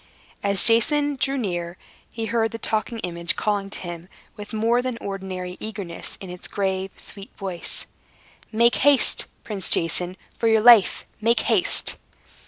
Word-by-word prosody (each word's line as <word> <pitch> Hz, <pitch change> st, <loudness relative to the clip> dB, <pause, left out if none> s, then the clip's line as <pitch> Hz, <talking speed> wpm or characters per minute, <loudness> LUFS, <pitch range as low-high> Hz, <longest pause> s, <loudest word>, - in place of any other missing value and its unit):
As 200 Hz, -2 st, +4 dB
Jason 290 Hz, +6 st, +3 dB
drew 270 Hz, +1 st, 0 dB
near, 175 Hz, -6 st, -3 dB, 0.3 s
he 225 Hz, -1 st, -5 dB
heard 225 Hz, +1 st, +1 dB
the 230 Hz, -, -6 dB
Talking 225 Hz, +1 st, 0 dB
Image 170 Hz, +1 st, -1 dB
calling 205 Hz, -2 st, -1 dB
to -, -, -3 dB
him 175 Hz, 0 st, -7 dB, 0.3 s
with 205 Hz, -1 st, -9 dB
more 230 Hz, +2 st, +2 dB
than 255 Hz, -2 st, -3 dB
ordinary 185 Hz, -2 st, -5 dB
eagerness, 200 Hz, -6 st, -7 dB
in 195 Hz, -, -8 dB
its 180 Hz, -, -8 dB
grave, 190 Hz, -1 st, -2 dB
sweet 200 Hz, 0 st, -5 dB
voice: 190 Hz, -4 st, -2 dB, 0.7 s
"Make 235 Hz, +2 st, +3 dB
haste, 285 Hz, -2 st, +4 dB, 0.2 s
Prince 205 Hz, -4 st, -5 dB
Jason! 175 Hz, +2 st, +1 dB, 0.2 s
For 230 Hz, -, 0 dB
your 220 Hz, -1 st, +4 dB
life, 230 Hz, -4 st, +6 dB, 0.2 s
make 230 Hz, +2 st, +3 dB
haste!" -, -, +1 dB
205 Hz, 150 wpm, -23 LUFS, 185-230 Hz, 0.7 s, life